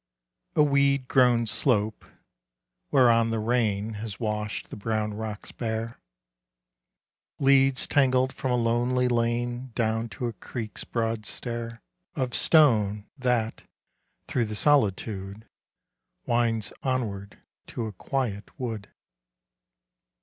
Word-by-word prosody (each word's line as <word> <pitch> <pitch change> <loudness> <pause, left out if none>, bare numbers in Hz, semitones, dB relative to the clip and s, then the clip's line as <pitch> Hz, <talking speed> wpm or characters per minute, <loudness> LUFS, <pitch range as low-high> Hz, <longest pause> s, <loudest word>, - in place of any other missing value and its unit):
A 150 - +6
weed 140 -2 +2
grown 125 -3 +4
slope, 110 -2 +1 0.8
whereon 115 -4 +4
the 115 - -1
rain 110 -2 0
Has 105 -1 -6
washed 105 -1 -3
the - - -5
brown 105 0 -2
rocks 110 -1 -6
bare, 115 0 -4 1.4
Leads 135 -1 +4
tangled 130 -2 +3
from 130 - -3
a 125 - +2
lonely 120 +2 +1
lane 120 +1 -1
Down 115 0 0
to 115 +4 -5
a 120 - -2
creek's 110 +2 -7
broad 115 -2 -2
stair 115 -1 -5 0.3
Of 125 -2 -2
stone, 105 -10 +4
that, 125 -5 -1 0.6
through 120 -3 0
the 105 0 -5
solitude, 105 -6 +1 0.8
Winds 115 -2 0
onward 105 -7 -3 0.3
to 115 - -4
a 110 - -4
quiet 110 -1 -3
wood. 110 -6 -4
115 Hz, 110 wpm, -27 LUFS, 110-125 Hz, 1.4 s, A